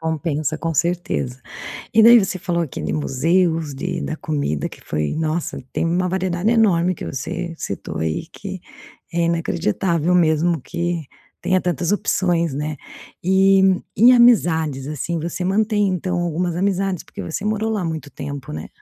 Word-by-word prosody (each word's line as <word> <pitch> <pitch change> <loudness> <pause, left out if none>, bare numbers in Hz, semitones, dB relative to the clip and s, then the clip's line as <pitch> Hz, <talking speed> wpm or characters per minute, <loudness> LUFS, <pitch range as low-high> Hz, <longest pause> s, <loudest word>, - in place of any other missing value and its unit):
Compensa 155 -1 -2
com 165 -1 -2
certeza. 165 -7 -1 0.5
E 225 - +6
daí 235 +2 +9
você 190 -2 -2
falou 170 -1 -1
aqui 150 - -6
de - - -2
museus, 160 +2 +1
de 135 - -3
da 155 - -3
comida 145 - -2
que - - -13
foi 75 0 -2
nossa, 160 0 -2
tem - - 0
uma 175 +2 +1
variedade 185 +2 0
enorme 185 -6 +3
que - - -7
você 165 +6 -4
citou 100 - -5
aí, 80 -1 -2
que - - -7 0.5
é 170 - +1
inacreditável 170 - 0
mesmo 160 -2 +2
que 170 +2 -2 0.4
tenha 185 - +2
tantas 175 0 -1
opções, 175 -6 +1
né. 150 +2 -3 0.5
E, 190 +1 +5 0.3
em 240 +4 +7
amizades, 160 - +4
assim, 160 +3 -3
você 170 +3 -4
mantém, 205 +2 +2
então, 180 0 -1
algumas 175 0 -1
amizades, 195 -1 0
porque - - -9
você 165 +5 -4
morou 215 +1 0
lá 215 -4 -1
muito 160 -3 -4
tempo, 140 -1 -7
né? 80 +1 -6
170 Hz, 155 wpm, -21 LUFS, 155-185 Hz, 0.5 s, daí